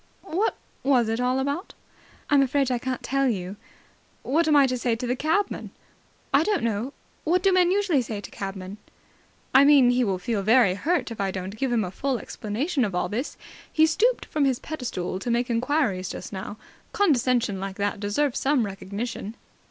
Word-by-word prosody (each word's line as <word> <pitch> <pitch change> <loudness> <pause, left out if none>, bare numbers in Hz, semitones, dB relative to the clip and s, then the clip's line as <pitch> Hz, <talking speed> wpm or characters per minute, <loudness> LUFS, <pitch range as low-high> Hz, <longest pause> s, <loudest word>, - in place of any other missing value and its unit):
What 390 +5 0 0.3
was 250 -5 +3
it 225 +1 -1
all 250 +1 +1
about?" 280 +8 -3 0.6
"I'm 285 -1 +6
afraid 270 0 +1
I 245 - 0
can't 255 +1 -4
tell 275 0 +1
you." 190 -3 -3 0.7
"But - - -7
what 325 +3 +3
am 305 - +4
I 285 -1 +7
to 255 -1 0
say 240 -1 0
to 245 +2 -5
the 250 +1 0
cabman?" 320 +9 -1 0.6
"I 275 - +6
don't 410 - 0
know. 230 +4 -1 0.3
What 355 +3 +1
do 390 -1 +4
men 360 -1 +4
usually 375 -7 +2
say 220 -3 -5
to 200 - -10
cabmen?" 195 0 -6 0.8
"I 270 - +8
mean 280 -4 +6
he 250 +1 +2
will 195 -5 0
feel 205 +3 -2
very 220 -1 +4
hurt 305 - -1
if 225 - -5
I 195 - 0
don't 190 +1 -5
give 260 +3 -1
him 230 -3 +2
a 180 - -4
full 265 +5 -1
explanation 250 - -2
of 200 -5 -2
all 180 - 0
this. 240 +7 -4 0.3
He 315 - +5
stooped 460 +10 +1
from 300 -2 0
his 265 -3 +2
pedestal 235 - -4
to 240 - -4
make 240 +1 0
enquiries 230 -7 0
just - - -7
now. 195 +2 -6 0.4
Condescension 250 - +2
like 195 0 -5
that 205 0 -2
deserves 235 +7 0
some 270 -4 +2
recognition." 205 +3 -5
250 Hz, 195 wpm, -25 LUFS, 205-285 Hz, 0.8 s, I